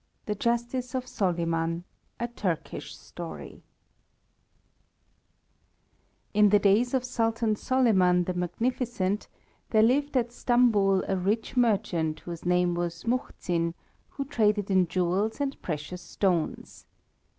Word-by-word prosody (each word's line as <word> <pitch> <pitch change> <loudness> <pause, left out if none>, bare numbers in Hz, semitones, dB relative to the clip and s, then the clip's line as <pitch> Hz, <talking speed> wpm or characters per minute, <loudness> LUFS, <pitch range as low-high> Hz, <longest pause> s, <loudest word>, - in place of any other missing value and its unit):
IV - - -40
THE 210 - -1
JUSTICE 240 +2 -1
OF 255 -1 -2
SOLIMAN 170 -4 -1 0.4
A 235 - -1
TURKISH 195 -8 -4
STORY - - -9 2.7
In 210 0 +5
the 205 - +6
days 210 +6 +3
of 255 - +1
Sultan 225 -3 0
Soliman 195 -8 +3
the 185 - -2
Magnificent 205 +2 -1 0.4
there 220 -1 +4
lived 280 +4 +2
at 240 -1 0
Stambul 225 -6 +3
a 195 - +1
rich 205 +7 -1
merchant 195 -10 +1
whose 170 -1 -8
name 180 0 +3
was 170 -1 -3
Muhzin, 175 -8 -1 0.3
who 275 - -5
traded 210 -7 +1
in 185 -2 +4
jewels 185 - 0
and 280 -1 -2
precious 160 +2 -5
stones. 175 -2 -2
205 Hz, 115 wpm, -27 LUFS, 180-240 Hz, 2.7 s, the